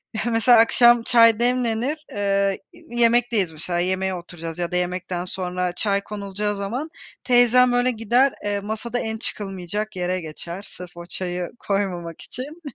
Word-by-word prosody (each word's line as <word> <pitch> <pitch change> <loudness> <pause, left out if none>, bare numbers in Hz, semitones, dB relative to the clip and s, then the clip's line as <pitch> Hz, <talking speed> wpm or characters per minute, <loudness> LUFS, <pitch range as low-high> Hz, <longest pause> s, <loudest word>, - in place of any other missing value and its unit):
Heh, 220 - -2
mesela 230 +1 +5
akşam 240 0 +5
çay 230 -2 +5
demlenir, 250 +4 0
eee, 200 -1 0
iii, 240 0 -9
yemekteyiz 230 -6 +3
mesela 175 +3 -2
yemeğe 185 +1 0
oturacağız 170 -1 -8
ya 175 0 -2
da - - -2
yemekten 180 0 -2
sonra 180 -1 -2
çay 200 +1 0
konulacağı 205 0 -3
zaman 235 +11 -4 0.4
teyzem, 245 0 +5
böyle, 245 +1 +3
gider, 240 +4 +2
eee, 205 0 0
masada 220 +4 -3
en 220 0 -3
çıkılmayacak 205 0 -4
yere 180 0 -1
geçer 170 +4 -7
sırf 175 -1 -10
o 170 - -8
çayı 180 -1 -4
koymamak 180 -5 -2
için. 295 +7 -8
205 Hz, 150 wpm, -23 LUFS, 180-235 Hz, 0.4 s, mesela